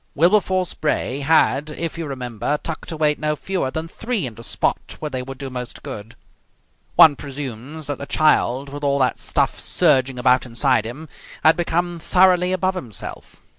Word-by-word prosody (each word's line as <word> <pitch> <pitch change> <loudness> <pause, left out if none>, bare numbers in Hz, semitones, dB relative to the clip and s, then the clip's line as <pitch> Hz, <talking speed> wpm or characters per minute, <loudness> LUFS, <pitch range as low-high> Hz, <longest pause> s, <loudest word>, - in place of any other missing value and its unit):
Wilberforce 185 +2 +3
Bray 150 -3 -1
had, 150 0 +2
if 165 +1 -4
you 165 -2 -4
remember, 130 +1 -3
tucked 160 +1 -5
away 155 -2 +2
no 150 0 0
fewer 180 -3 -2
than 160 +4 -4
three 225 - -2
in 120 - -6
the 115 - -12
spot - - -1
where 150 -1 -5
they 130 -1 -2
would 135 +1 -8
do 135 -1 -6
most 125 -1 -7
good. 105 +2 -8 0.8
One 155 -3 +8
presumes 140 +1 -7
that 145 -1 -4
the 140 - -6
child, 140 -3 +2
with 145 +1 -8
all 140 -1 +2
that 130 -2 +1
stuff - - 0
surging 135 -6 +3
about 125 +1 +3
inside 125 -1 +1
him, 140 +8 -7 0.4
had 160 - +6
become 175 0 -1
thoroughly 180 +1 +3
above 185 0 +1
himself. 120 - -7
145 Hz, 170 wpm, -21 LUFS, 130-165 Hz, 0.8 s, One